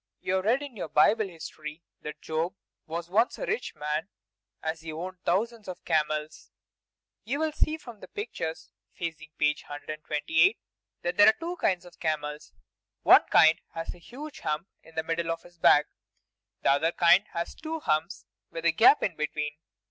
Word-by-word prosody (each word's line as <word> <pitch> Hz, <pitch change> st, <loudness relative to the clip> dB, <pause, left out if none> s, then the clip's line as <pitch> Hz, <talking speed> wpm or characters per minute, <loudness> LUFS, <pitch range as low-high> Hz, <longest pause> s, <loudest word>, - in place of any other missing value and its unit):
You 185 Hz, -, -2 dB
have 190 Hz, -, -2 dB
read 250 Hz, +6 st, +3 dB
in 280 Hz, -4 st, -8 dB
your 195 Hz, -, -4 dB
Bible 205 Hz, +9 st, +4 dB
history 160 Hz, -2 st, -8 dB, 0.2 s
that 150 Hz, -, -8 dB
Job 160 Hz, +3 st, -1 dB, 0.3 s
was 165 Hz, +1 st, -4 dB
once 220 Hz, +7 st, +2 dB
a -, -, -3 dB
rich 460 Hz, -, -2 dB
man, 150 Hz, +4 st, -2 dB, 0.5 s
as 160 Hz, 0 st, -3 dB
he 160 Hz, 0 st, -6 dB
owned 180 Hz, +4 st, -6 dB
thousands 220 Hz, +4 st, 0 dB
of 185 Hz, -, -8 dB
camels. 155 Hz, -1 st, -1 dB, 0.7 s
You 260 Hz, +6 st, -2 dB
will 315 Hz, +1 st, 0 dB
see 310 Hz, +1 st, +1 dB
from 240 Hz, -8 st, -11 dB
the -, -, -11 dB
pictures 165 Hz, -, -5 dB, 0.2 s
facing 160 Hz, -2 st, -5 dB
page 150 Hz, 0 st, +2 dB
128 155 Hz, +5 st, +1 dB, 0.5 s
that 175 Hz, +1 st, -2 dB
there 205 Hz, -, +8 dB
are 220 Hz, -, +8 dB
two 340 Hz, +2 st, -3 dB
kinds 180 Hz, -, +1 dB
of 175 Hz, -, -15 dB
camels; 150 Hz, -2 st, -3 dB, 0.5 s
one -, -, +7 dB
kind 160 Hz, +1 st, +6 dB, 0.2 s
has 165 Hz, 0 st, -4 dB
a 175 Hz, -, -16 dB
huge 280 Hz, -, -9 dB
hump 155 Hz, +4 st, -2 dB, 0.2 s
on 165 Hz, -, -17 dB
the 160 Hz, -, 0 dB
middle 165 Hz, +1 st, -1 dB
of 165 Hz, -, -4 dB
his 175 Hz, -1 st, -18 dB
back; 150 Hz, -2 st, +6 dB
and -, -, -51 dB
the -, -, +5 dB
other 155 Hz, +4 st, +3 dB
kind 180 Hz, +3 st, +5 dB
has 170 Hz, -1 st, -3 dB
two 320 Hz, +1 st, -5 dB
humps, 155 Hz, -, -1 dB, 0.2 s
with 165 Hz, 0 st, -6 dB
a 170 Hz, -, +6 dB
gap 235 Hz, -, +6 dB
between. 150 Hz, -4 st, -2 dB
170 Hz, 180 wpm, -28 LUFS, 155-205 Hz, 0.7 s, there